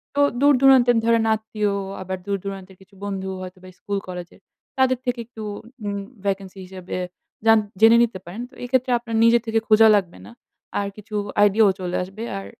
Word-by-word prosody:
তো 285 - 0 0.2
দূর-দূরান্তের 265 -4 +5
ধরেন 230 -1 +3
আত্মীয়, 215 -1 -2 0.3
আবার 190 0 -4
দূর-দূরান্তের 195 -1 -5
কিছু 195 +1 -20
বন্ধু 190 -1 -4
হয়তোবা 185 0 -10
স্কুল-কলেজের 185 -3 -6 0.4
তাদের 260 -1 +3
থেকে 245 -1 -1
একটু 225 -1 -12 0.4
উম 200 0 -2 0.3
ভ্যাকেন্সি 195 -1 -3
হিসেবে 185 -1 -7 0.5
জান 225 0 +7 0.2
জেনে 225 +1 +8
নিতে 220 -5 -2
পারেন। 185 +7 -7
তো - - -27
এক্ষেত্রে 255 +1 0
আপনার 230 -1 -5
নিজের 230 0 +5
থেকে 225 0 +2
খোঁজা 220 0 +6
লাগবে 185 -4 -2
না। - - -12 0.5
আর 200 - -2
কিছু 210 +1 -9 0.3
আইডিয়াও 205 0 +5
চলে 180 -1 -3
আসবে। 195 +5 -8
আর 195 - -7
205 Hz, 160 wpm, -22 LUFS, 190-230 Hz, 0.5 s, জেনে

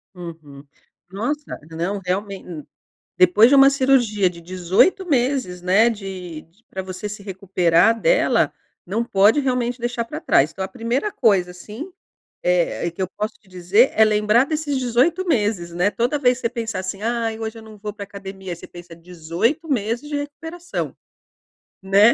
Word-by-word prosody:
Uhum. 160 -5 -10 0.5
Nossa, 290 +10 -4
não, 180 +5 -2
realmente, 195 +1 -3
hum, 155 -5 -7 0.5
depois 185 +5 +6
de - - +5
uma 275 0 +8
cirurgia 260 -8 +3
de 170 - -12
18 185 - +2
meses, 255 - 0
né, 195 +6 +4
de 185 -7 -7
d 180 +8 -30
pra 190 - -4
você 185 +2 -6
se 205 -1 -8
recuperar 190 +1 +2
dela, - - +3 0.4
não 220 +6 -1
pode 205 +4 +4
realmente 250 -2 -1
deixar 240 0 -2
pra - - -6
trás. 145 +3 +3
Então 190 +4 -5
a - - -5
primeira 240 - -2
coisa, 195 -7 +2
assim, 215 - -9 0.5
eh, - - +1
e - - -1
que 180 +3 -5
eu 185 - -1
posso 210 +1 -2
te 210 - -28
dizer 185 +7 +3
é 220 - +5
lembrar 215 +3 +3
desses 300 -2 -2
18 260 +9 +1
meses, 205 - 0
né. 180 +4 +2
Toda 245 +7 0
vez 250 -2 +2
que - - -13
você 230 - +1
pensar 230 -4 -4
assim: 190 +2 -5
"Ai, 230 -1 -1
hoje 225 0 -5
eu - - -11
não 220 -1 -13
vou 210 +1 -5
pra 205 0 -7
academia", 195 -2 -8
você - - -11
pensa: 175 -1 -12
18 180 - -2
meses 240 +2 -1
de 295 - -2
recuperação, 325 +5 -5 0.9
né, 200 +4 +6
210 Hz, 175 wpm, -21 LUFS, 185-250 Hz, 0.9 s, uma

